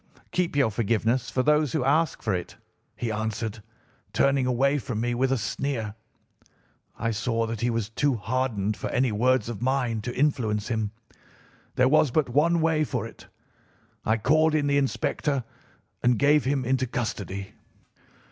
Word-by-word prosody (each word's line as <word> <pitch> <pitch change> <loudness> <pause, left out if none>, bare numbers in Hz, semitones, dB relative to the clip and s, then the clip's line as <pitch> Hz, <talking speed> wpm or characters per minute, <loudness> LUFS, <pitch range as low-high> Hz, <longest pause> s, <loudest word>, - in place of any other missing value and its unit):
"'Keep 180 -4 0
your 140 -6 +3
forgiveness 115 +3 0
for 130 +3 0
those 150 0 +3
who 155 -5 +1
ask 155 +3 +1
for 110 - 0
it,' 90 -1 -4 0.4
he 115 - -3
answered, 110 0 -3 0.5
turning 135 -2 +2
away 135 +3 +2
from 120 -4 -4
me 120 +1 0
with 130 +2 +1
a 135 - +2
sneer. 110 +1 -3 1.0
I 115 - -1
saw 115 +1 0
that 115 -1 -4
he 120 - +1
was 115 -2 -1
too 135 +4 +1
hardened 110 -3 -1
for - - -4
any 125 -2 +1
words 125 +2 +2
of 115 -4 -5
mine 125 -3 0
to 120 +3 -5
influence 115 -7 0
him. 110 -3 -1 0.9
There 125 - +4
was 155 +1 +4
but 140 +1 +1
one 160 +6 +3
way 160 -1 +2
for - - -2
it. - - -12 0.8
I 110 +1 +2
called 155 +7 +3
in 150 -2 +2
the 140 0 +3
inspector 140 0 -1 0.6
and 120 -1 +3
gave 145 +2 +4
him 135 -1 0
into 130 +1 +1
custody. 100 - -4
125 Hz, 165 wpm, -26 LUFS, 110-140 Hz, 1.0 s, There